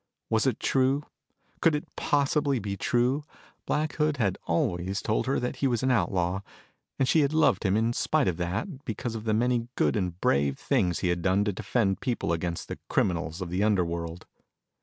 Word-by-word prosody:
Was - - +2
it - - 0
true? 135 +2 +2 0.6
Could 165 -3 +4
it 150 - -4
possibly 140 -1 +1
be 100 -3 -3
true? 125 +8 +1 0.4
Black 155 +1 -1
Hood 150 -1 +1
had 100 -7 0
always 90 +3 0
told 110 - -1
her 135 - +1
that 125 +2 -3
he 135 - +1
was 120 -1 0
an 130 - +3
outlaw, 90 -4 +1 0.6
and 135 - +2
she 160 - +4
had 145 0 +2
loved 155 - +3
him 95 0 +2
in 115 +2 +1
spite 155 +3 +1
of 85 - 0
that 110 - -3
because 115 +2 -4
of 110 -1 -6
the 110 - +1
many 120 0 +1
good - - +2
and 90 -4 -2
brave 70 -3 +2
things 95 - 0
he 90 - +1
had 85 0 0
done 95 +2 +2
to 105 - 0
defend 100 0 0
people 120 -9 -1
against 85 0 -3
the - - -6
criminals 85 0 0
of 90 -2 -4
the 90 +2 0
underworld. 85 -4 -1
110 Hz, 195 wpm, -27 LUFS, 90-130 Hz, 0.6 s, Could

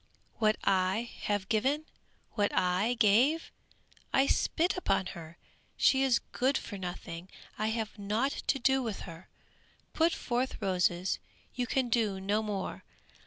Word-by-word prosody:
"What 215 -1 +3
I 195 +4 +1
have 205 -2 0
given? 270 +9 +1 0.5
What 205 -2 +1
I 185 +7 +2
give? 245 +9 +3 0.6
I 270 - +4
spit 335 +5 +1
upon 365 - +1
her! 170 -2 -10 0.4
She 265 - +4
is 265 -3 +4
good 265 +3 +2
for 205 - -6
nothing! 180 -1 -6 0.3
I 215 - +1
have 220 -1 -3
nought 215 +7 0
to 275 - -1
do 265 +1 +3
with 225 -5 -4
her. 165 0 -10 0.6
Put 330 +1 +3
forth 255 -3 -2
roses, 180 -1 +1 0.3
you 250 -2 -2
can 255 -1 0
do 220 -5 +1
no 200 +3 0
more! 205 -3 -4
215 Hz, 140 wpm, -31 LUFS, 190-260 Hz, 0.6 s, I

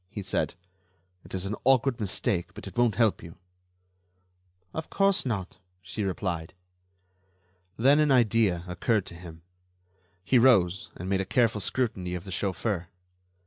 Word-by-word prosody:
he 105 -1 -6
said. 95 - -1 0.7
"It - - -8
is 95 0 -3
an 100 +2 -2
awkward 130 -1 +3
mistake, 95 -3 -1
but - - -9
it 95 -2 -9
won't 120 -2 +2
help 115 -4 +2
you." 85 0 -11 1.4
"Of 160 - -5
course 195 -6 +2
not," 100 -6 -4 0.2
she 95 +3 -5
replied. 90 -4 -3 1.2
Then 140 +6 +5
an 150 -1 +3
idea 110 -8 +3
occurred 95 +3 0
to - - -9
him. 85 -2 -11 0.8
He 125 +5 +4
rose 95 -8 +4
and 90 - -7
made 95 0 +1
a - - -1
careful 115 +1 +1
scrutiny 95 -6 -1
of 90 - -5
the 95 - -9
chauffeur. 95 0 -1
100 Hz, 145 wpm, -27 LUFS, 90-120 Hz, 1.4 s, Then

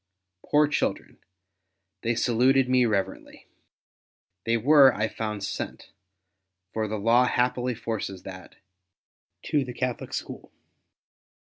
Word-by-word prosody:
Poor 150 0 +3
children! 145 - -2 0.8
they 115 +1 0
saluted 125 +3 +3
me 125 -1 +3
reverently. 100 -4 -3 1.0
They 115 0 +2
were, 135 +3 +6
I 110 +1 0
found, 105 -2 -5
sent - - -6 0.4
— 95 0 -55
for 110 -1 -1
the 110 +1 -3
law 115 +4 +4
happily 125 0 0
forces 110 -5 -5
that 95 -1 -10 0.4
— - - -62
to 150 -3 +2
the 125 -1 -7
Catholic 125 0 -3
School. - - -7
115 Hz, 120 wpm, -26 LUFS, 105-125 Hz, 1.0 s, were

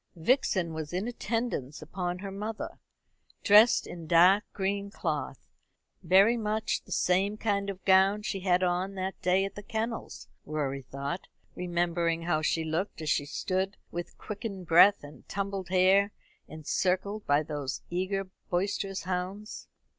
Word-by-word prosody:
Vixen 180 - +1
was 155 0 -5
in 190 +5 -1
attendance 225 - -3
upon 175 +3 -4
her 195 +1 -6
mother, 210 +3 -5 0.6
dressed 210 +3 +6
in 170 -2 -8
dark 180 +5 +6
green 200 +1 -2
cloth. - - -3 0.6
Very 195 +6 +5
much 220 -1 -1
the - - -15
same 195 +4 +1
kind 200 -2 -1
of 190 -1 -7
gown 195 +2 +4
she 195 - -2
had 185 -1 +2
on 180 +2 0
that 190 0 -4
day 185 +1 +3
at 195 - -6
the 205 - -8
kennels, 225 +3 -4 0.2
Rorie 140 -3 -3
thought, 140 +6 -5 0.3
remembering 170 -1 -1
how 165 -2 +1
she 160 +1 +1
looked 165 +5 -2
as 155 -2 -1
she 145 - 0
stood 190 +5 -2
with 175 0 -6
quickened 200 -3 -6
breath 175 +4 +6
and 145 +1 -13
tumbled 195 -2 -3
hair, 190 +2 +4 0.4
encircled 185 +6 -1
by 145 +2 +3
those 145 -3 -4
eager 190 +2 -1 0.3
boisterous 195 +1 -1
hounds. 185 +3 -4
185 Hz, 145 wpm, -29 LUFS, 170-200 Hz, 0.6 s, dressed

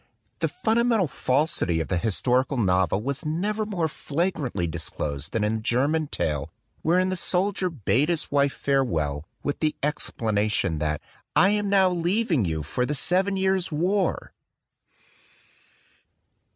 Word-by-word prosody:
The - - +1
fundamental 230 - +1
falsity 130 - 0
of 80 - -2
the 90 - 0
historical 125 +7 +1
novel 95 -2 +2
was 140 +5 -3
never 205 +8 -1
more 175 -6 0
flagrantly 150 - -2
dis 80 0 -4
closed 70 -1 -4
than 115 - 0
in 105 +1 +1
the - - -6
German 140 +7 +1
tale, 75 - -2 0.3
wherein 180 +3 +2
the 185 - -1
soldier 185 +1 0
bade 145 - +1
his 170 -3 -1
wife 140 -1 +3
farewell, 80 - 0 0.2
with 145 - -2
the 155 -1 0
explana 110 -7 0
tion, 90 -7 0
that 75 0 -1 0.3
"I 190 - +6
am 205 -1 0
now 195 -1 +5
leaving 175 - +1
you 80 -2 -2
for 105 +11 -2
the 150 +4 -1
Seven 190 +7 +1
Years 190 -2 +1
War!" 180 +5 0
145 Hz, 145 wpm, -25 LUFS, -, 0.3 s, I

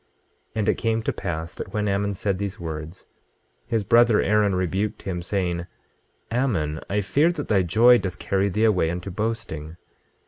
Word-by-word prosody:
26:10 - - -43 0.5
And 110 -1 +1
it - - +2
came 115 -1 0
to - - -1
pass 80 -3 -4
that - - -8
when 105 0 0
Ammon 100 +1 0
had 100 - -4
said 100 -1 -1
these 100 +1 -4
words, 80 +1 -6 0.6
his 115 -3 0
brother 115 +2 +5
Aaron 105 -2 +2
rebuked 95 +3 -1
him, 90 -3 -3
saying: 90 -2 -2 0.6
Ammon, 100 - 0
I 105 +1 +1
fear 145 - +2
that 150 -4 -5
thy 100 -3 +4
joy 115 +7 +5
doth 90 -2 -4
carry 100 +1 0
thee 105 +3 0
away 95 -7 +3
unto 90 +3 -4
boasting. 90 -7 -4
100 Hz, 180 wpm, -24 LUFS, 90-110 Hz, 0.6 s, brother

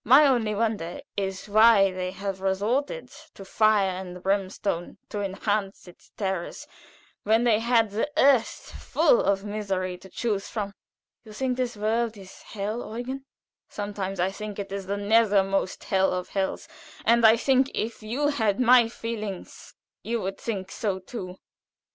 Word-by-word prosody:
My 265 +6 +7
only 235 -6 +2
wonder 205 -6 -2
is 195 -1 -3
why 215 -2 +6
they 185 0 -3
should 190 +1 -11
have 195 -1 -3
resorted 225 - -1 0.2
to 195 - -10
fire 215 -1 +3
and 180 -1 -7
brimstone 195 -2 -1
to 205 - -3
enhance 195 0 -2
its 180 - -16
terrors 190 -4 -3 0.6
when 220 +3 +3
they 225 -3 +4
had 230 -2 +2
the 225 +8 -1
earth 270 -6 +3
full - - +3
of 200 0 0
misery 190 -3 -3
to 190 - -14
choose 205 -1 -2
from." 205 -3 -4 0.5
"You 215 -2 -12
think 255 +3 -1
this 245 -3 -2
world 220 +1 0
a 195 - -10
hell, 215 +4 -6
Eugen?" 260 +3 -5 0.4
"Sometimes 200 -2 -4
I 185 +2 +1
think 210 0 -7
it 200 -1 -5
the 200 +1 -3
very 200 +2 -4
nethermost 200 -3 +2
hell 190 0 +2
of 180 0 -3
hells, 190 -1 -2 0.4
and 235 0 +4
I 220 +1 +7
think 265 +2 +3
if 230 +1 -3
you 250 +7 0
had 220 -8 0
my 245 -2 +6
feelings 215 -5 -6 0.3
you 235 +1 -2
would 195 0 -4
think 195 -4 -4
so 205 -5 -2
too. 185 -1 -8
205 Hz, 160 wpm, -26 LUFS, 195-230 Hz, 0.6 s, My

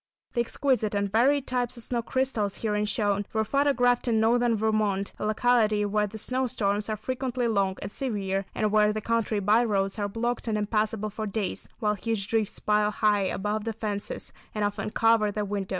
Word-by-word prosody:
The 240 - +2
exquisite 235 -3 0
and 200 -1 0
varied 270 +6 +3
types 250 -1 -1
of 235 - -5
snow 240 0 -1
crystals 235 -5 -1
herein 210 -1 +1
shown, 205 -2 0
were 220 -1 +2
photographed 255 -2 +2
in 225 -2 +3
northern 235 +1 +3
Vermont; 210 -2 0
a - - -1
locality 215 -2 +2
where 210 +1 +1
the 220 +2 -8
snow 255 +4 -1
storms 210 -3 -1
are 215 - -1
frequently 255 -1 -2
long 200 -4 +1
and - - -5
severe 200 -7 -2
and 215 -1 +1
where 210 0 +4
the 215 - -2
country 230 -1 0
by 210 +4 +4
roads 200 -2 0
are 205 0 -1
blocked 240 +3 -2
and 215 -1 0
impassable 215 0 -1
for 215 +1 -4
days, 200 -1 -3
while 210 -3 +1
huge 210 -1 -2
drifts 220 -1 0
pile 210 0 +2
high 210 -2 +2
above 210 +3 -2
the 225 0 -3
fences, 210 -2 -4 0.2
and 210 -1 +1
often 205 +1 -2
cover 225 -1 +3
the 210 0 -2
windows. 200 -1 -3
215 Hz, 195 wpm, -27 LUFS, 205-235 Hz, 0.2 s, where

